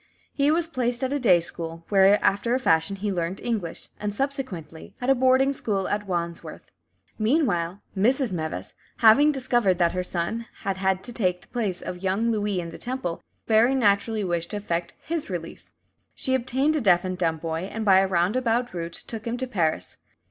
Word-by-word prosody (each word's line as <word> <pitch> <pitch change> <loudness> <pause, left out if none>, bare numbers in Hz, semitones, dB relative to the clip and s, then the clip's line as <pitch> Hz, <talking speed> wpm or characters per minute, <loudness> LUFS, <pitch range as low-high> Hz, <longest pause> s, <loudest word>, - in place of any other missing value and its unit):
He 280 0 +2
was 325 +2 +2
placed 250 -5 -1
at 260 +1 0
a 285 - 0
day 190 -9 +5
school, 165 0 -5
where 195 0 +6
after 230 +5 +2
a - - +1
fashion 165 -4 +2
he 200 +1 -2
learnt 175 +1 -2
English, 205 -9 -4
and, 210 0 -2
subsequently, 210 - -4
at 255 +1 +2
a - - +7
boarding 260 +1 +3
school 200 -7 -2
at 205 0 -2
Wandsworth. 170 -2 -4 0.6
Meanwhile, 205 - +1
Mrs. 245 +4 +2
Meves 160 - -4 0.2
having 245 +7 +6
discovered 240 -9 +1
that 170 -1 +3
her 185 - -1
son 180 +6 -3 0.2
had 195 -3 -1
had 190 0 0
to 240 - -7
take 180 -6 0
the - - -20
place 210 -7 -2
of 180 -1 -6
young 195 +5 +1
Louis 205 -3 0
in 170 -1 -5
the 165 - -10
Temple, 245 -9 -4 0.2
very 230 +4 +4
naturally 215 -2 +2
wished 170 -2 -1
to 210 - -3
effect 175 -4 -3
his 325 -5 -3
release. 170 -3 -6 0.4
She 260 - -1
obtained 260 +4 +1
a 305 - 0
deaf 180 -5 +4
and 185 0 -2
dumb 165 -3 0
boy, 165 +3 -4
and 225 0 -4
by 190 -2 +6
a 195 - +2
roundabout 225 +7 +1
route 170 -1 -4
took 225 +4 -7
him 235 +1 -2
to 260 - -2
Paris. 175 -11 -1
205 Hz, 190 wpm, -25 LUFS, 175-245 Hz, 0.6 s, a